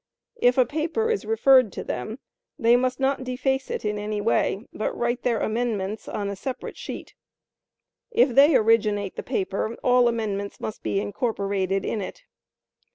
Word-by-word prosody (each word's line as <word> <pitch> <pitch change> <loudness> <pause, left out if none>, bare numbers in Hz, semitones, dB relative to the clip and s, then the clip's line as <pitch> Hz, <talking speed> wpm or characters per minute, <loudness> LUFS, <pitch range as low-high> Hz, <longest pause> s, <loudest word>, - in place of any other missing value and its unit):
If 245 +1 +4
a 255 - +5
paper 330 - -1
is 440 - -1
referred 225 +1 +5
to - - -5
them 170 - -4 0.4
they 235 -4 +5
must 255 +1 0
not 270 0 +1
deface 265 +1 -1
it - - -4
in 210 0 -1
any 210 0 -3
way, 205 0 +1
but 215 - -3
write 240 +1 -1
their 235 -3 +1
amendments 215 -3 -2
on 205 - -3
a 200 - -3
separate 255 +6 -6
sheet. - - -8 1.0
If 455 - +4
they 275 +4 +6
originate 210 -4 +2
the - - -4
paper, 195 +4 -2
all 250 -1 +5
amendments 205 -4 -2
must 215 - -5
be 195 - -1
incorporated 200 -3 -1
in 215 - -2
it. 195 - -7
230 Hz, 160 wpm, -25 LUFS, 205-255 Hz, 1.0 s, they